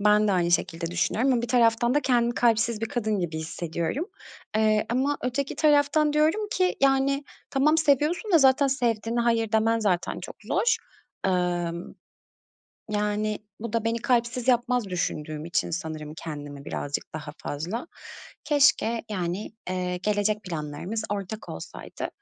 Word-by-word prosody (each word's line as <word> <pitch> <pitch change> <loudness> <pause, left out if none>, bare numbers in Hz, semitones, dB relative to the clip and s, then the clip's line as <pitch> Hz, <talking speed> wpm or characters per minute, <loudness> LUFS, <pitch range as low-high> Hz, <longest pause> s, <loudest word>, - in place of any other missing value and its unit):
ben 210 0 +4
de - - +3
aynı 175 -2 +2
şekilde 170 -1 0
düşünüyorum 195 +10 +1
ama 235 - +1
bir 240 - -3
taraftan 235 0 +3
da 295 - +4
kendimi 240 -3 +2
kalpsiz 230 -2 +2
bir 225 - -1
kadın 220 -3 -1
gibi 165 -3 -2
hissediyorum. 165 - -3 0.5
Eee, 215 -1 +3
ama 270 +4 +1
öteki 265 +3 -2
taraftan 295 0 +4
diyorum 315 +8 +2
ki, 365 0 +1
yani, 275 +1 +3 0.3
"Tamam, 300 +4 +3
seviyorsun 315 - +2
da 335 - +8
zaten 270 0 +5
sevdiğine 235 -3 0
hayır 230 -2 +1
demen 225 +1 +3
zaten 190 -5 0
çok - - -8
zor." 460 -1 +2 0.5
Imm. 175 -2 -1 1.0
Yani, 210 0 0 0.2
bu 230 -1 -5
da 230 -1 0
beni 230 +1 0
kalpsiz 240 +1 0
yapmaz 245 -1 +3
düşündüğüm 170 -5 -3
için 170 +1 -1
sanırım 155 -3 -5
kendimi 145 -3 -7
birazcık 145 +1 -4
daha 150 -1 -5
fazla. 175 - -4 0.6
Keşke, 275 -6 +3
yani, 185 +1 -3 0.2
eee, 180 -1 -1
gelecek 210 +2 0
planlarımız 170 +5 -4
ortak 205 +1 -4
olsaydı. - - -7
220 Hz, 145 wpm, -26 LUFS, 180-260 Hz, 1.0 s, da